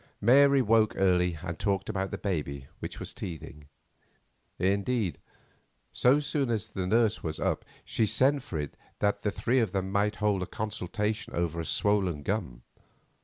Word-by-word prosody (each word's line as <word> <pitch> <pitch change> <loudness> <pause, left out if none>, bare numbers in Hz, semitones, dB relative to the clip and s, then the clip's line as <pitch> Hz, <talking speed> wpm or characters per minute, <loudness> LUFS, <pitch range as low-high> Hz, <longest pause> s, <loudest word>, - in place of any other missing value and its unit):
Mary 140 +4 +6
woke 110 -1 +3
early 90 -3 +2
and 85 -3 -5
talked 100 -1 0
about 95 0 -2
the - - -4
baby, 70 -8 -3
which - - -6
was - - -6
teething; 75 -4 -8 0.9
indeed, 100 - 0 0.7
so 130 +4 +4
soon 145 -3 -1
as 110 -2 -1
the 95 -3 -3
nurse 110 +1 +2
was 80 -1 -3
up - - 0 0.2
she 110 - +1
sent 140 +6 +3
for 95 - -6
it 75 -1 -5 0.2
that 105 0 +1
the 105 - 0
three 120 +5 +1
of 110 -6 0
them 95 -1 -1
might 100 +1 +1
hold 105 -2 +1
a 90 - -3
consultation 105 +1 -3
over 85 -1 -1
a 85 - -3
swollen 95 -8 +1
gum. 65 - -3
100 Hz, 165 wpm, -29 LUFS, 90-110 Hz, 0.9 s, Mary